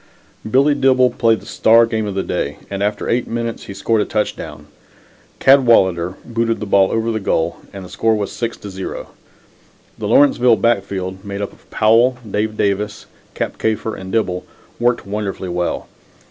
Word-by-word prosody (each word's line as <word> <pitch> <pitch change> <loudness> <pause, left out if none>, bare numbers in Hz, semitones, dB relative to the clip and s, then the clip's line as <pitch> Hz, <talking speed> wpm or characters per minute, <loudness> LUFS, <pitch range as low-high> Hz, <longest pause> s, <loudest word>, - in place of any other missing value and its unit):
Billy 140 +5 +4
Dibble 130 -2 +3
played 115 -2 +2
the - - -15
star 115 +1 +4
game 110 -2 -2
of 100 - -4
the 95 - -1
day - - -3
and 100 0 -3
after 105 +1 -1
eight 120 +1 0
minutes 115 0 -4
he - - -7
scored 110 +2 +1
a - - 0
touchdown. 105 -1 -4 0.7
Cadwalader 95 -10 +4
booted 115 -1 -1
the 105 - -4
ball 100 -1 +3
over 115 +1 0
the 110 - -1
goal 85 -4 -1
and 95 -2 -8
the - - -11
score 115 -1 +1
was 105 -2 -3
6 115 -1 -4
to 100 - -9
0. 95 0 -6 0.9
The - - -3
Lawrenceville 125 -4 +5
backfield, 95 -4 -1
made 100 -1 -6
up 100 - -5
of - - -23
Powell, 115 +4 +3
Dave 105 +1 -2
Davis, 105 +1 -1 0.3
Cap - - -3
Kafer 110 0 -1
and 95 0 -8
Dibble, 90 -5 0 0.4
worked 120 0 +1
wonderfully 100 -2 -4
well. 90 0 -2
110 Hz, 175 wpm, -18 LUFS, 100-115 Hz, 0.9 s, Lawrenceville